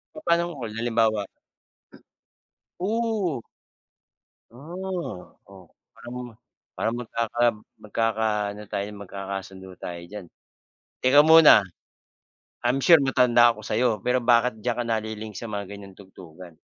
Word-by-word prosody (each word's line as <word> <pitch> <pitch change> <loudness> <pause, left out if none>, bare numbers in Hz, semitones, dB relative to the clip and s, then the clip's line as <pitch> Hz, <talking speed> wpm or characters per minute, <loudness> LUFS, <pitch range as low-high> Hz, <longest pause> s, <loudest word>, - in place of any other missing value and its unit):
Papa'nong 170 - 0
hul 115 -3 -5
halimbawa 115 -3 +1 1.5
Ooh. 210 - -1 1.1
Ah, 170 - -7
oo, 95 -3 -16 0.2
parang 120 +1 -11 0.6
parang 115 - -2
magkaka 115 -1 -3 0.4
magkakaano 105 -1 -1
tayo, 100 0 -2
magkakasundo 95 -1 -8
tayo 85 -1 -7
diyan. 105 0 -9 0.8
Teka 130 +3 +6
muna. 155 -9 +7 1.0
I'm 130 +3 +1
sure 170 +4 +7
matanda 125 -4 +4
ako 110 - -12
sa'yo, 120 +3 +1
pero 125 +3 +1
bakit 120 -1 +2
diyan 120 +2 -3
ka - - -2
nali-link 110 -1 -4
sa - - -6
mga 100 -3 -5
ganyang 100 -1 -10
tugtugan? 90 -3 -14
115 Hz, 110 wpm, -25 LUFS, 100-130 Hz, 1.5 s, muna